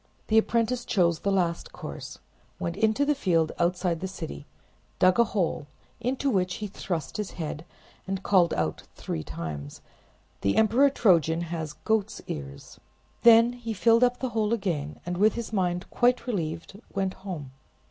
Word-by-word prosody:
The 220 0 +6
apprentice 235 +2 0
chose 170 -8 +2
the 200 - 0
last 175 -3 0
course; - - -8 0.4
went 170 0 -3
into 220 +7 +2
the 295 - +3
field 170 - +1
outside 175 -1 +1
the 190 - -3
city, 70 - -7 0.5
dug 185 +4 +4
a 235 - +6
hole, 180 -8 -1 0.3
into 255 +4 -1
which 185 -3 +1
he 215 - -5
thrust 185 -4 -4
his 210 -2 -4
head, 155 -1 -5 0.4
and 195 0 -3
called 180 -4 +4
out 80 -1 -1
three 80 - -4
times— 75 -3 -6 0.6
"The 100 - +1
Emperor 235 +6 +5
Trojan 170 - +3
has 160 -3 -4
goat's 220 +6 -1
ears." 70 -1 -8 0.4
Then 230 +1 +7
he 235 -2 -5
filled 230 +4 +4
up 245 0 +2
the 260 - -2
hole 220 -1 0
again, 155 -8 -3
and 175 0 -3
with 210 +3 +4
his 235 -1 -5
mind 180 -3 0
quite 245 -1 +2
relieved 170 -3 -4
went 190 -1 0
home. 175 -9 -7
190 Hz, 160 wpm, -27 LUFS, 165-225 Hz, 0.6 s, Then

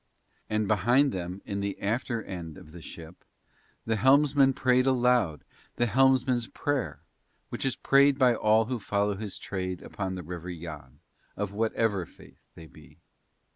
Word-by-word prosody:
And 110 -1 0
behind 120 +7 +3
them 90 +1 -5
in 100 -1 -4
the 100 0 -3
after 115 +2 -2
end 85 -5 -7
of 75 - -14
the 85 +1 -11
ship 80 +1 -11 0.6
the 110 -1 0
helmsman 135 +3 +4
prayed 130 0 +2
aloud 125 - +2 0.3
the 120 - +1
helmsman's 130 -1 +2
prayer, 145 -5 -3 0.5
which - - -4
is 135 - 0
prayed 140 0 +4
by 130 -3 +4
all 110 0 +3
who 125 +1 -3
follow 100 0 0
his 105 -1 -6
trade 95 -2 -4
upon 95 -2 -4
the 90 - -6
River 90 +1 -7
Yann, 80 -6 -9 0.4
of 105 -1 -3
whatever 110 -4 0
faith - - -18 0.2
they 80 - -11
be. - - -17
110 Hz, 155 wpm, -28 LUFS, 90-125 Hz, 0.6 s, helmsman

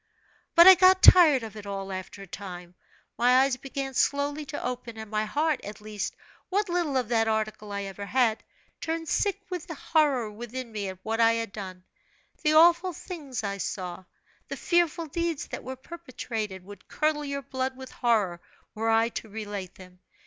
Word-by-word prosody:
But 340 0 +9
I 380 - +12
got 370 +1 +5
tired 310 -9 +8
of 220 -1 -8
it 205 -1 -9
all, 195 -1 -5
after 185 +1 -7
a - - -12
time: 180 -2 -8 0.5
my 250 +2 +5
eyes 270 -1 +2
began 270 +1 -5
slowly 285 +3 0
to 290 +1 -5
open, 245 -2 -5
and 220 -1 -8
my 215 0 0
heart 300 +6 0
at 205 +1 -8
least, 210 -1 -5 0.3
what 405 +1 0
little 345 -6 0
of 250 -3 0
that 225 -2 +2
article 215 -1 -2
I 200 0 -3
ever 200 +1 -7
had 235 -3 +1 0.4
turned 325 0 -3
sick 400 +4 0
with 360 -3 -5
horror 300 -8 +1
within 240 +3 -7
me 205 -3 -3
at 190 - -8
what 225 +1 -2
I 230 0 +5
had 230 -2 -3
done. 185 -3 -8 0.6
The 305 - +2
awful 345 +3 +5
things 295 - -6
I 200 -1 -3
saw, 185 -1 -5 0.4
the - - -5
fearful 345 -1 +1
deeds 335 0 -2
that - - -6
were 260 +1 -6
perpetrated, 240 - -6
would 200 0 -13
curdle 305 -1 0
your 280 -1 -4
very - - -36
blood 260 0 -2
with 260 -1 -10
horror, 210 -8 +1 0.3
were 225 +1 -1
I 225 +1 +3
to 225 - -7
relate 205 -3 -6
them. 180 -1 -15
240 Hz, 185 wpm, -27 LUFS, 210-300 Hz, 0.6 s, I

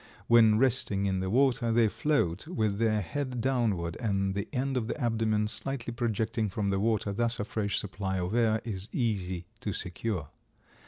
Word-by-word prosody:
When 110 -2 +6
resting 110 -6 +1
in 95 -1 0
the 95 0 -2
water 125 0 +3
they 115 0 +4
float 110 - 0
with 110 - -1
their 110 -2 +2
head 130 - -3
downward 110 -10 0
and 95 -4 0
the 100 0 -3
end 135 0 -1
of 120 -3 -1
the 115 - -4
abdomen 110 -3 +1
slightly 120 +1 -3
projecting 115 -2 -1
from 100 +1 -1
the 95 - +1
water; 105 -1 +1
thus 115 +3 0
a - - 0
fresh 105 -2 -1
supply 95 -1 -2
of 90 +2 -2
air 115 -2 +2
is 100 -3 -5
easy 95 -8 -1
to 105 - -3
secure. 90 -4 -3
110 Hz, 175 wpm, -29 LUFS, 100-120 Hz, -, When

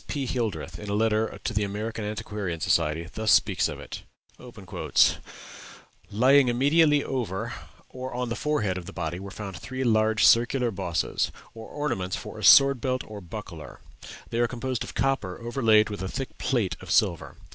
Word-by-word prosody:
P. 140 -3 -3
Hildreth, 100 - -3
in 105 - -7
a 100 - 0
letter 110 0 0
to 120 - -2
the 105 0 +1
American 110 +2 -4
Antiquarian 105 -4 -4
Society, 80 0 0
thus 110 0 0
speaks - - +3
of - - -7
it: - - -8 2.1
"Lying 130 +5 +4
immediately 145 +4 +3
over 115 -8 -3 0.3
or 130 0 -7
on 125 0 -3
the 115 - -2
forehead 110 -13 -1
of 90 - -11
the 100 - -8
body 85 0 -4
were 100 +1 -8
found 95 -2 -7
three 130 +9 -5
large 110 -3 +3
circular 120 +1 +4
bosses, 85 -3 -1 0.2
or 115 -1 -10
ornaments 120 -11 -2
for - - -8
a - - -8
sword 135 -3 +7
belt 130 -1 -1
or 105 -1 -9
buckler; 90 -4 -9 0.5
they 115 - -1
are 120 - +3
composed 125 0 -3
of - - -9
copper 135 -9 -1
overlaid 115 -3 +2
with 100 - -5
a 95 - -3
thick 135 +5 -5
plate 115 -8 0
of - - -11
silver. - - +1
110 Hz, 170 wpm, -26 LUFS, 100-130 Hz, 2.1 s, sword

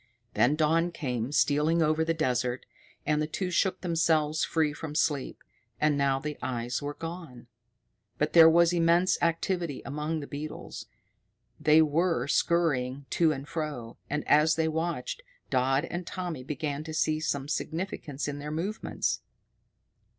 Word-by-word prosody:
Then 120 +7 +3
dawn 165 +3 +2
came 125 -6 -3
stealing 150 +3 +3
over 155 +1 +2
the 165 - 0
desert, 125 -4 -1 0.4
and 150 0 +1
the 150 - -1
two 180 +3 -3
shook 185 +1 +1
themselves 160 -3 +1
free 155 -2 +1
from 150 0 -7
sleep. 145 -4 -1 0.4
And 150 -1 +3
now 140 -1 +2
the 150 +2 -5
eyes 120 -1 -2
were 145 0 -4
gone. 165 -8 -8 0.7
But 150 - 0
there 165 -1 +9
was 170 +1 +4
immense 175 +2 +3
activity 170 -2 -1
among 150 +3 -3
the 145 - -6
beetles. 150 +2 -7 0.7
They 155 +1 +6
were 165 +2 +1
scurrying 140 -5 +1
to 165 -2 +3
and 140 -1 -5
fro, 145 -9 -5
and, 150 +1 -2
as 150 +2 +5
they 160 0 +1
watched, 170 - -2 0.3
Dodd 135 +3 +2
and 175 0 -5
Tommy 175 -8 -4
began 145 +1 -3
to 155 -1 -6
see 155 0 +1
some 140 -3 -2
significance 160 -3 -3
in 145 0 -4
their 150 +1 -6
movements. 180 +8 -2
155 Hz, 150 wpm, -28 LUFS, 140-165 Hz, 0.7 s, there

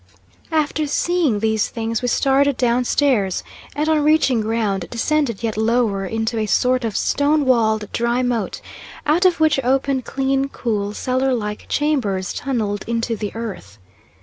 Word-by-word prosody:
After 310 -1 0
seeing 320 -5 +1
these 220 -1 +1
things 225 0 -3
we 250 - -1
started 275 +2 +2
down 245 0 +1
stairs, 235 -10 +1 0.3
and 300 +2 -1
on 310 -2 +2
reaching 295 -6 +3
ground 210 -4 -1
descended 240 -2 -1
yet 225 -2 -1
lower 220 -3 +1
into 225 +2 -2
a 215 - -1
sort 250 +6 +2
of 225 -3 -2
stone 290 +1 +1
walled 220 -4 +2
dry 235 +2 0
moat, 240 -4 -2 0.4
out 325 +5 +2
of 360 -3 +3
which 310 -3 +3
opened 265 +1 +1
clean, 270 0 0
cool, 210 -5 -3
cellar 260 0 0
like 210 -2 -5
chambers 240 -11 0
tunnelled 215 -7 -2
into 230 0 -1
the 210 -1 -4
earth. 200 - -7
240 Hz, 150 wpm, -20 LUFS, 220-275 Hz, 0.4 s, reaching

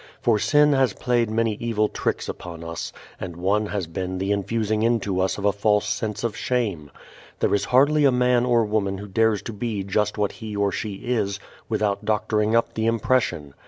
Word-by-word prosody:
For 110 -3 +2
sin 150 +5 +4
has 135 -2 +2
played 120 -2 0
many 115 0 +1
evil 110 -2 +1
tricks - - -2
upon 85 -2 -7
us, 85 0 -5 0.3
and 90 -3 -6
one 100 +5 +1
has 100 -3 -2
been 90 +3 -4
the 95 +2 -1
infusing 105 +1 0
into 110 -5 +1
us 95 0 0
a 100 0 +2
false 105 +1 +1
sense 105 +1 -2
of 115 -3 -1
shame. 100 - -2 0.5
There - - +1
is 100 - +1
hardly 145 +4 +4
a 135 - +6
man 125 -1 +3
or 120 -2 +3
woman 100 -2 -1
who 100 +2 -8
dares 110 +1 +1
to 115 - -6
be 105 -2 -3
just 105 +2 0
what 105 -1 +1
he 110 -3 -7
or 100 -1 +1
she 105 +2 -3
is 100 -3 -2 0.3
without 105 -1 0
doctoring 105 +1 +1
up 115 - +2
the 110 0 -1
impression. 110 - 0
105 Hz, 195 wpm, -24 LUFS, 100-115 Hz, 0.5 s, a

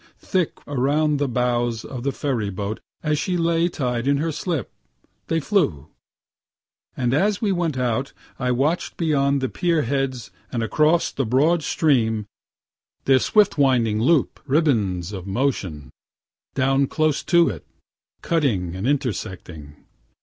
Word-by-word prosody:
Thick, 185 -5 -1
around 145 +2 +1
the 145 - +1
bows 120 -2 0
of 130 -3 -6
the 140 +2 -1
ferry 125 -8 -2
boat 100 +3 -4 0.2
as 150 -1 +1
she 180 +3 -1
lay 170 0 +2
tied 125 -6 -2
in 140 0 +3
her 160 +3 -1
slip, 160 -2 -3 0.6
they 165 - +1
flew; 140 - 0 1.1
and 125 -1 0
as 200 +7 +2
we 210 -3 0
went 170 -6 -1
out 125 +1 -1 0.3
I 125 -1 0
watch'd 145 +8 0
beyond 140 -4 +1
the 130 - 0
pier 170 +1 0
heads, 130 -2 -2 0.2
and 115 -3 -1
across 155 +8 +2
the 135 - -2
broad 145 +8 +2
stream, 115 -10 +1 0.8
their 135 -1 +5
swift 205 - +3
winding 120 -6 +3
loop 145 +3 +2
ribands 105 - +1
of 95 -1 -6
motion, 95 - -2 0.6
down 135 +1 +2
close 155 0 +1
to 170 -2 +4
it, 85 -8 -6 0.6
cutting 110 - 0
and 95 +6 -3
intersecting. 90 - -4
135 Hz, 140 wpm, -22 LUFS, 115-155 Hz, 1.1 s, their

